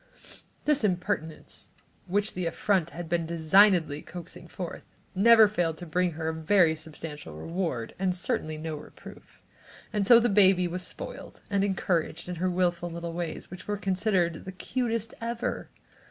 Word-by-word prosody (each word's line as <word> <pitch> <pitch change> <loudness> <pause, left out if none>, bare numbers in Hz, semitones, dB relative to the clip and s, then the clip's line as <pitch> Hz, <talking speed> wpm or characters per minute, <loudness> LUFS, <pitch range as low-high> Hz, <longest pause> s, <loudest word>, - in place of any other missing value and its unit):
This 300 -5 +3
impertinence, 180 -4 -2 0.4
which 205 +3 0
the 180 -2 -2
affront 180 0 +1
had 170 0 -7
been 170 -1 0
designedly 165 -2 +4
coaxing 175 0 -10
forth, 175 0 -6 0.3
never 220 +3 +7
failed 175 -6 -1
to 175 - -8
bring 175 +1 0
her 160 0 -3
a - - -2
very 160 +1 +3
substantial 150 - -9
reward, 160 - -3
and 185 -1 0
certainly 165 -7 -2
no 160 0 -4
reproof. 150 - -13 0.5
And 205 -2 +1
so 235 -1 +9
the 240 - +2
baby 190 -4 +5
was 180 +1 -4
spoiled 180 - -7
and 200 -1 +2
encouraged 175 -4 -1
in 180 -1 -5
her 185 +2 0
wilful 175 -1 0
little 170 0 -5
ways 170 -1 -5
which 180 - -10
were 205 0 -1
considered 185 -3 0
the 190 - -5
"cutest 230 +2 -2
ever." 235 +1 -3
180 Hz, 155 wpm, -28 LUFS, 165-200 Hz, 0.5 s, so